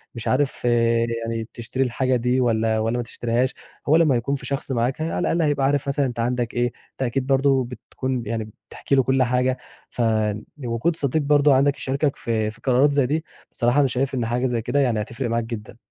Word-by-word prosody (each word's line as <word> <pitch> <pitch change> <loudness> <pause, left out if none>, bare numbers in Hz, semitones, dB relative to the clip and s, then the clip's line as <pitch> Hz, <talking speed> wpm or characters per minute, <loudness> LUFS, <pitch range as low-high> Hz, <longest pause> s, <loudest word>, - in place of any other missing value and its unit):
مش 115 - -6
عارف 135 +1 +1
آآ، 115 -1 +3 0.2
يعني 115 -1 -3
تشتري 125 +3 -2
الحاجة 130 +1 0
دي 125 +2 +1
والَّا، 110 -2 +1
والَّا 115 +2 0
ما 120 - -1
تشتريهاش، 120 +2 -1 0.4
هو 155 - +6
لمّا 160 -5 +4
يكون 130 +4 0
في - - -7
شخص 140 0 -2
معاك 125 +4 0
على 160 +1 -2
الأقل 170 - +1
هيبقى 145 -3 +1
عارف 140 0 +1
مثلًا 140 0 +1
أنت 120 -2 -4
عندك 120 0 -1
إيه، 120 0 +1 0.3
أنت - - -13
أكيد 130 +1 -1
برضه 135 -1 +3
بتكون 125 0 -4
يعني 110 0 -3 0.2
بتحكي 140 - -1
له 135 - +4
كُلّ 130 0 +2
حاجة، 125 +1 +1 0.3
فوجود 115 +5 -1
صديق 145 +1 0
برضه 145 0 +4
عندك 140 +1 +3
يشاركك 140 +2 -1
في 110 -2 -1
في 115 - -17
قرارات 135 +3 +3
زي 140 -2 +3
دي، 155 +5 -1 0.3
بصراحة 120 +3 +1
أنا 140 - +4
شايف 130 +2 -1
إن 120 -3 -1
حاجة 120 +3 0
زي 120 -3 0
كده 145 - 0
يعني 120 -6 +2
هتفرق 115 +3 -4
معاك 115 0 0
جدًا. 115 -1 -7
125 Hz, 205 wpm, -23 LUFS, 115-140 Hz, 0.4 s, هو